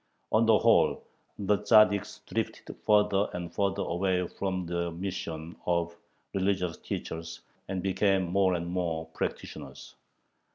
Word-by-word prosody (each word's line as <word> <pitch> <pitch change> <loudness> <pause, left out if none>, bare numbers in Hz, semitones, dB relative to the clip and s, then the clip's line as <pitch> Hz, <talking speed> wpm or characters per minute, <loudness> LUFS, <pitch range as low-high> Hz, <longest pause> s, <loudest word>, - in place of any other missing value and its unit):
On 110 +1 +4
the 110 -1 +6
whole, - - +4 0.3
the 100 0 +1
Tzaddiks 105 -2 +4
drifted - - -4
further 105 -1 +4
and 85 -1 -5
further 100 +1 0
away 90 +1 0
from 95 -1 -3
their 85 0 -2
mission 85 -2 -5
of 85 -1 0 0.4
religious 95 -3 0
teachers, 80 0 -6 0.3
and 95 -2 -3
became 95 0 +2
more 95 +1 +2
and 85 0 -3
more 85 -3 -2
"practitioners." - - -5
95 Hz, 125 wpm, -29 LUFS, 85-100 Hz, 0.4 s, the